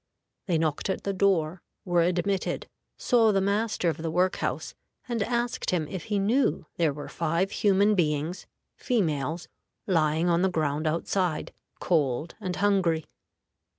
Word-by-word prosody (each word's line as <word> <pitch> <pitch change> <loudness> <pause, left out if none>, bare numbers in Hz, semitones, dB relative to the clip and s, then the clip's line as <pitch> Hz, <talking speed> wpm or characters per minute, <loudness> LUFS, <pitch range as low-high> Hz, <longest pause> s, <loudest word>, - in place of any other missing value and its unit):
They 175 -4 +2
knocked 155 +3 -1
at 190 - -2
the 200 - -1
door, 185 -3 +1 0.2
were 175 -2 +2
admitted, 180 +3 0 0.3
saw 230 -3 +4
the 195 - +2
master 200 0 0
of 160 -3 0
the 160 0 -3
work 180 +3 +1
house, - - -3 0.3
and 235 -3 -2
asked 240 +2 -1
him 165 -4 0
if 185 -1 -6
he 210 - -1
knew 200 - +1
there 165 -3 +2
were 145 +1 -7
five 170 +4 -1
human 205 +1 +3
beings 160 -1 -1 0.3
females 165 - -1 0.4
lying 160 -2 +2
on 170 0 +3
the 190 - +3
ground 155 -2 -1
outside, 170 +1 -1 0.3
cold 150 -2 0
and 185 -3 -3
hungry. 185 -6 +2
175 Hz, 150 wpm, -27 LUFS, 160-200 Hz, 0.4 s, saw